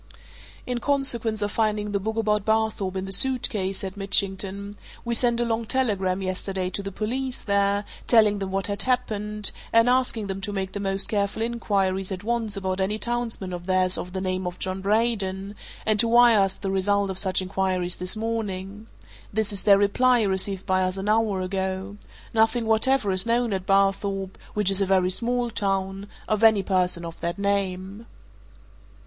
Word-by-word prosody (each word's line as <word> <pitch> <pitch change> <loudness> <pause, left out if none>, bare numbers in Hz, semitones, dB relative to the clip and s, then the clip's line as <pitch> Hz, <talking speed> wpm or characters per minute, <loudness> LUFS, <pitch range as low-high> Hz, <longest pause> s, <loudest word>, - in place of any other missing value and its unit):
"In 250 -1 -2
consequence 235 -6 0
of 205 - -2
finding 210 -2 -1
the 200 - 0
book 220 +3 -3
about 210 -2 +1
Barthorpe 220 -3 0
in 190 0 -3
the 195 - -7
suit 255 +5 +4
case," 195 -4 -2
said 190 0 -6
Mitchington, 200 0 0 0.3
"we 235 - -1
sent 235 0 +3
a 240 - +1
long 230 -1 -2
telegram 195 -8 0
yesterday 185 0 -3
to 200 - -3
the 195 0 -6
police 250 +6 -3
there, 200 0 +1 0.2
telling 215 -3 +4
them 195 -1 -4
what 195 0 -1
had 200 0 0
happened, 210 -5 0 0.2
and 230 +1 +4
asking 250 -4 +1
them 195 0 -5
to 205 - -3
make 190 -1 -3
the 205 - -5
most 195 -1 +1
careful 205 +1 -1
inquiries 195 -5 -1
at 185 0 -5
once 225 -2 -1
about 190 -1 -2
any 205 +3 0
townsman 230 -5 -3
of 175 0 -7
theirs 185 -1 +2
of 180 - -4
the 190 - -3
name 185 -1 -2
of 180 0 -6
John 190 0 -3
Braden, 200 -2 0 0.3
and 215 -1 +2
to 230 - +3
wire 235 -1 +6
us 195 -1 +2
the 195 -2 -4
result 200 +1 +1
of 190 - -2
such 190 -2 +3
inquiries 185 -1 -2
this 180 +3 -2
morning. 215 -2 -4 0.4
This 215 0 -1
is 195 - 0
their 200 -1 +6
reply, 240 +4 +3
received 190 -1 -1
by 185 -1 +1
us 185 +1 -1
an 195 +2 -3
hour 215 -3 +1
ago. 190 +1 -3 0.4
Nothing 225 +1 +2
whatever 220 0 +2
is 185 +4 +4
known 235 -1 +1
at 190 -1 -4
Barthorpe 195 0 +1 0.2
which 210 -2 +2
is 195 +1 -1
a 195 - +1
very 185 -1 +2
small 240 +3 0
town 195 -1 -2 0.2
of 215 +1 0
any 220 -3 +5
person 180 -3 0
of 165 -1 -7
that 170 +2 -3
name." 200 +1 -2
200 Hz, 185 wpm, -24 LUFS, 190-220 Hz, 0.4 s, wire